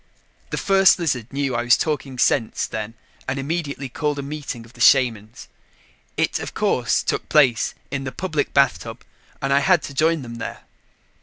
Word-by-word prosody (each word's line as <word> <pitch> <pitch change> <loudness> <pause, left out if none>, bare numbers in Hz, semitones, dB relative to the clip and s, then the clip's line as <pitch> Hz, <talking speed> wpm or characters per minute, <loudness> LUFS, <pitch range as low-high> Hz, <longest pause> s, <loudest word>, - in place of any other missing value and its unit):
The - - -3
First 195 -1 +5
Lizard 130 - -2
knew 140 -1 -1
I 120 - 0
was 120 0 +4
talking 145 -4 -3
sense 115 -2 +1
then 110 +1 -5 0.3
and 130 +1 -2
immediately 140 -1 -3
called 150 +3 -2
a 140 - -4
meeting 140 -5 -6
of 115 - -18
the 120 - -12
shamans. 115 -5 +3 0.7
It, - - 0
of - - -7
course, - - +1
took - - -2
place 130 -7 +3 0.2
in 135 -1 -3
the 130 - -4
public 160 -3 -2
bathtub 130 -4 +1 0.4
and 135 0 +1
I 140 - +5
had 175 +3 +3
to 140 - -7
join 160 +1 +1
them 115 -1 -8
there. - - -6
135 Hz, 175 wpm, -22 LUFS, 120-150 Hz, 0.7 s, First